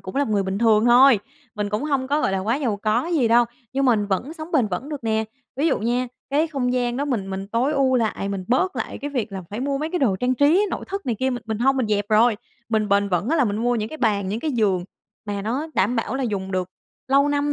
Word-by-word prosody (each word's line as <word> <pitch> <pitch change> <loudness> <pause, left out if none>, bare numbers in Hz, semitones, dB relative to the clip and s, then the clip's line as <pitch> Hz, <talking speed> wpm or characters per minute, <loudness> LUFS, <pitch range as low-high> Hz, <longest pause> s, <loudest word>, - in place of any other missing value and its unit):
cũng 185 - -8
là 285 - +3
một 225 - -5
người 200 - +2
bình 190 +1 -3
thường 220 -2 +4
thôi 245 -1 +7 0.4
mình 210 -1 -2
cũng 210 +5 -1
hông 275 -3 -1
có 295 +2 +1
gọi 195 - 0
là 195 - 0
quá 215 +6 0
giàu 245 -8 -1
có 215 +6 0
gì 315 -9 +1
đâu, 235 +1 +5 0.3
nhưng 275 +1 0
mình 220 -5 +3
vẫn 200 - -2
sống 320 +1 -9
bền 265 -8 +3
vững 200 +10 -4
được 290 -5 -6
nè, 220 0 +1 0.3
ví 290 +4 +1
dụ - - +2
nha 240 +3 0 0.2
cái 300 +4 +2
không 265 -5 -1
gian 245 -1 0
đó 280 - -1
mình 225 -9 -2
mình 195 +1 -5
tối 240 +7 +1
ưu 270 -3 +2
lại, 220 -4 -1
mình 195 -2 -4
bớt 370 +11 +1
lại - - -4
cái 290 +1 -5
việc 235 -6 -3
là 190 -1 -5
phải 210 +3 -4
mua 275 +1 -1
mấy 310 +3 -3
cái 360 - -1
đồ 235 - +2
trang 250 +5 0
trí 310 +10 +4
nội - - -4
thất 395 +1 -5
này 240 - 0
kia 260 0 +1
mình 245 -1 -4
mình 220 -1 -3
hông 270 +3 +3
mình 255 -4 0
dẹp 205 -1 0
rồi. 220 +1 +4 0.3
Mình 215 -2 0
bền 200 0 +2
vững 180 +3 0
á 325 - +2
là 285 - +3
mình 205 -3 -1
mua 240 +2 +1
những 215 -2 -2
cái 315 - -9
bàn, 205 -6 +1
những 210 +4 -3
cái 310 - -1
giường 200 -7 +1 0.4
mà 200 -1 -3
nó 250 +9 -2
đảm 210 +6 +1
bảo 230 +1 -2
là 270 - -1
dùng 200 -5 -3
được 185 -1 -1 0.4
lâu 280 +2 +4
năm 290 0 0
240 Hz, 285 wpm, -23 LUFS, 210-275 Hz, 0.4 s, thôi